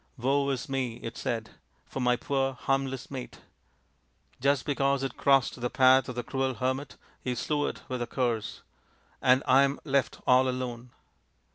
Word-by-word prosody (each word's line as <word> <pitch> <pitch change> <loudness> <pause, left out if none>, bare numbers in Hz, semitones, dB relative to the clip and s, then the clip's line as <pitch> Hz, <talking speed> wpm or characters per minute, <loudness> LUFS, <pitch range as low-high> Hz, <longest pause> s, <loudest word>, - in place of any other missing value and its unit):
" - - -39
Woe 140 +3 +1
is 135 +2 -2
me," 130 -4 -2
it 115 - -5
said, 115 -2 -3 0.2
" - - -40
for - - -4
my 125 -1 +3
poor, 135 +1 -1
harmless 135 0 -2
mate. 130 -2 -7 1.0
Just 140 0 +2
because 140 -1 +1
it 135 -3 -3
crossed 135 -3 +2
the 125 - 0
path 130 0 +5
of 125 - -5
the 120 - -3
cruel 130 +1 -1
hermit 130 +3 -2 0.3
he 125 -1 -1
slew 145 +4 0
it - - -6
with 125 -1 -3
a 120 - -2
curse! 120 -4 -2 0.6
And 130 +1 +4
I 130 +1 +6
am 140 +1 +1
left 140 -3 0
all 130 +1 +5
alone 125 -1 -4
130 Hz, 175 wpm, -28 LUFS, 125-135 Hz, 1.0 s, I